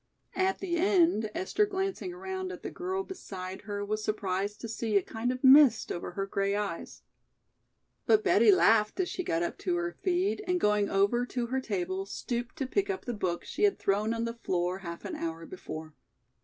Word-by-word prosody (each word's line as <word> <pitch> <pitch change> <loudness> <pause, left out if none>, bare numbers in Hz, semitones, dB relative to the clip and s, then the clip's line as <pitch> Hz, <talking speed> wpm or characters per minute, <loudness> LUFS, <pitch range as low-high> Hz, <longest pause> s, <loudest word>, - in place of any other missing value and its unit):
At 380 0 +1
the 345 -3 -2
end, 335 - +3
Esther 415 - +1
glancing 385 -1 -2
around 375 +1 -5
at - - -9
the - - -5
girl 375 +2 -3
beside 190 - -7
her 205 0 -2
was 215 +1 -2
surprised 205 -1 -2
to 230 - -4
see 220 -1 0
a 195 - +2
kind 230 +3 -2
of 255 +1 -5
mist 265 -3 +7
over 175 - -5
her 195 +2 -2
gray 195 0 0
eyes. 205 -5 -4 1.0
But 430 -1 +5
Betty 420 - +6
laughed 225 - +4
as 370 - +1
she 365 - -3
got 165 - 0
up - - -4
to 360 - 0
her 350 0 -1
feet 370 +3 0
and 360 0 +1
going 210 -4 +2
over 200 +5 +2
to 245 -1 -2
her 260 +2 -1
table 190 -3 -3
stooped 240 +3 -4
to 285 -4 -2
pick 400 +10 0
up 380 -1 -3
the 245 - -2
book 185 -5 -2
she - - -6
had 410 -1 +4
thrown 205 +3 +1
on 230 0 -1
the 230 - -3
floor 180 +1 0
half 170 -3 -7
an - - -4
hour 165 0 -4
before. 160 -3 -8
230 Hz, 200 wpm, -29 LUFS, -, 1.0 s, mist